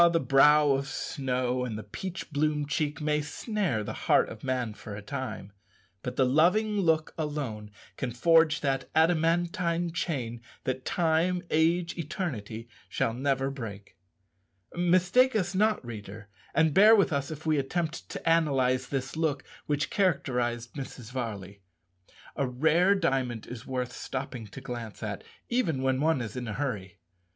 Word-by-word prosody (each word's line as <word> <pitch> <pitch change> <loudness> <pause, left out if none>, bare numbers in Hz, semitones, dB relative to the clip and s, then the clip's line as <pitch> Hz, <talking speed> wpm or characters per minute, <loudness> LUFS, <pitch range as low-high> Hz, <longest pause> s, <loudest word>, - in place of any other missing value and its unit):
the 165 - +4
brow 150 +1 +5
of 135 0 0
snow 130 -3 -2
and 115 -4 -3
the 110 - -6
peach 180 - -6
bloom 150 0 +1
cheek 150 +1 -1
may 150 0 +1
snare 155 - -2
the - - -5 0.2
heart - - +5
of 115 - -10
man 125 -4 -1
for 105 -1 -9
a 105 - -7
time, 100 0 -5 0.5
but 125 - -5
the 130 - +3
loving 185 +10 +3
look 160 -4 +2
alone 140 -9 -3 0.3
can 130 - -2
forge 160 +5 +4
that 135 -2 -1
adamantine 170 +1 +2
chain 125 -9 -3 0.2
that 130 0 -3
time, 175 +2 +1
age, 165 +2 +2
eternity 120 - -4 0.2
shall 115 - 0
never 135 +1 0
break. 105 -7 -8 0.8
Mistake 185 +9 +3
us 195 -3 0
not, 210 - +2
reader, 105 -2 -8 0.3
and 160 -2 +4
bear 210 +6 +8
with 200 -6 +3
us 140 -1 -1
if 155 0 -8
we 155 -2 +2
attempt 160 +4 -3
to - - -6
analyze 135 -6 +2
this 135 +1 -3
look 155 -4 0 0.2
which 145 0 0
characterized 125 - 0
Mrs. 130 -4 -8
Varley. 100 -6 -5 0.7
A 140 -3 0
rare 160 +9 +3
diamond 130 - 0
is 120 -3 -9
worth 125 -2 -3
stopping 130 -4 -5
to 135 - -10
glance 120 -5 -7
at, 105 -2 -4 0.2
even 170 - 0
when 130 0 +1
one 160 -3 +2
is 110 -1 -5
in 125 -2 -4
a 110 - -3
hurry. 105 -9 -4
140 Hz, 155 wpm, -28 LUFS, 125-165 Hz, 0.8 s, bear